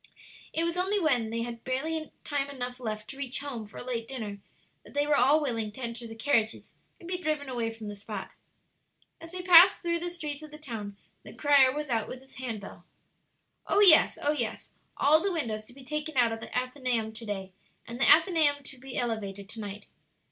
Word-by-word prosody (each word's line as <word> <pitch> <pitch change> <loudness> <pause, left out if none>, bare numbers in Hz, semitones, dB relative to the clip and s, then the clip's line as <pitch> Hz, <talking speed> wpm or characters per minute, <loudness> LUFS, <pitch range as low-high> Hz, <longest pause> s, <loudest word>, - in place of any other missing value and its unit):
It 325 - 0
was 340 +1 -1
only 390 +3 +1
when 255 - +2
they 230 +1 -2
had 235 -1 -7
barely 310 +5 -2
time 280 -1 -1
enough 250 -2 -5
left 215 -3 -5
to 270 - -11
reach 275 -1 -2
home 250 -7 -5
for 210 - -13
a - - -6
late 235 -2 -3
dinner 215 -6 -5 0.4
that - - -16
they 290 0 +2
were 295 0 +3
all 285 +4 +5
willing 230 -7 -2
to 260 - -10
enter 235 -1 -5
the 225 - -9
carriages 225 -2 0 0.3
and 340 - -12
be 360 0 -2
driven 305 -3 -1
away 235 -3 -2
from 225 -1 -9
the 205 - -5
spot. 205 +1 -7 0.9
As 330 0 -10
they 365 0 -5
passed 360 +2 +8
through 340 0 0
the 350 +1 -3
streets 305 -4 -5
of 310 - -10
the 300 - -10
town, 220 -9 -7 0.2
the - - -12
crier 280 -3 +5
was 295 -1 -4
out 225 -2 0
with 255 +1 -8
his 265 - -16
hand 240 -5 -4
bell. 200 - -11 0.8
"Oh 405 - +3
yes! 355 -6 +7
oh 290 - +1
yes! 235 -7 -3 0.3
all 310 +3 +5
the 395 - 0
windows 225 -11 -2
to 245 - -14
be 270 +1 -14
taken 300 +2 -4
out 240 -2 +4
of 225 - -4
the - - -9
Athenaeum 250 -3 -1
to 225 +1 -9
day, 195 -2 -4 0.3
and 235 +2 -8
the - - +5
Athenaeum 315 -4 +5
to 275 -2 -10
be 265 0 -7
elevated 205 -5 -3
to 225 - -8
night." 205 -1 -7
260 Hz, 220 wpm, -29 LUFS, 225-300 Hz, 0.9 s, passed